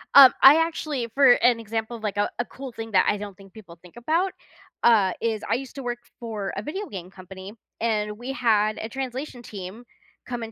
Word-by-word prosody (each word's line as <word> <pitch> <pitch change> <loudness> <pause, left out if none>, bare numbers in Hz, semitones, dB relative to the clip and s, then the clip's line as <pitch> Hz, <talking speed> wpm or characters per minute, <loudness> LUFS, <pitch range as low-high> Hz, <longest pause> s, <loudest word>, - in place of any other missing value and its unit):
Um, 270 -2 +11
I 280 +4 +10
actually 305 -7 -2
for 275 -3 +7
an 245 -2 +3
example 225 +1 -4
of, 220 - -16
like, 205 -1 -3
a 205 - +1
a 240 - 0
cool 265 +1 -9
thing 225 0 -7
that 190 - +4
I 210 - +1
don't 205 -2 -8
think 195 -1 -16
people 180 -6 -14
think 180 +2 -17
about, 330 +10 0 0.5
uh, 210 -6 +5
is 225 -2 -1
I - - +2
used 265 +3 -6
to 275 - -6
work 240 0 -3 0.2
for 215 -4 -5
a - - -2
video 380 - -5
game 185 -3 -8
company, 190 +1 -11 0.3
and 210 -2 -1
we 245 +4 -5
had 215 -4 +2
a 220 - -5
translation 260 0 -5
team 210 +1 -9 0.4
come 240 -2 -4
and 225 - -7
230 Hz, 215 wpm, -24 LUFS, 205-255 Hz, 0.5 s, Um